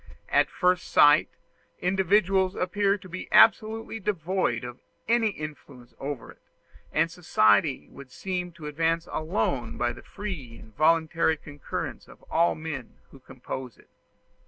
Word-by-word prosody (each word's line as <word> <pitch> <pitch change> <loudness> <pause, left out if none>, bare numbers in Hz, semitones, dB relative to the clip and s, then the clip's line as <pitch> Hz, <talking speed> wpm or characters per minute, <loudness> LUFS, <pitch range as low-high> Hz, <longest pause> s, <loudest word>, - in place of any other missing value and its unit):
At - - +3
first 180 0 +1
sight, 145 0 +5 0.5
individuals 190 +1 +2
appear 200 +2 +1
to 185 - -13
be 185 +1 -7
absolutely 225 0 +4
devoid 185 - -1
of 125 0 -8 0.3
any 230 0 +3
influence 145 -8 -9
over 140 -3 -5
it; - - -21 0.5
and 165 +1 +1
society 130 - +2
would 135 -2 -12
seem 180 +1 -4
to 165 -3 -11
advance 165 +2 0
alone 150 - -2
by 120 0 0
the - - -12
free 170 - -7
and 110 - -15
voluntary 160 0 +2
concurrence 145 -2 -6
of - - -17
all 170 +1 +3
the - - -12
men 150 -7 -6
who 135 - -14
compose 130 -1 -8
it. - - -23
165 Hz, 140 wpm, -27 LUFS, 135-190 Hz, 0.5 s, sight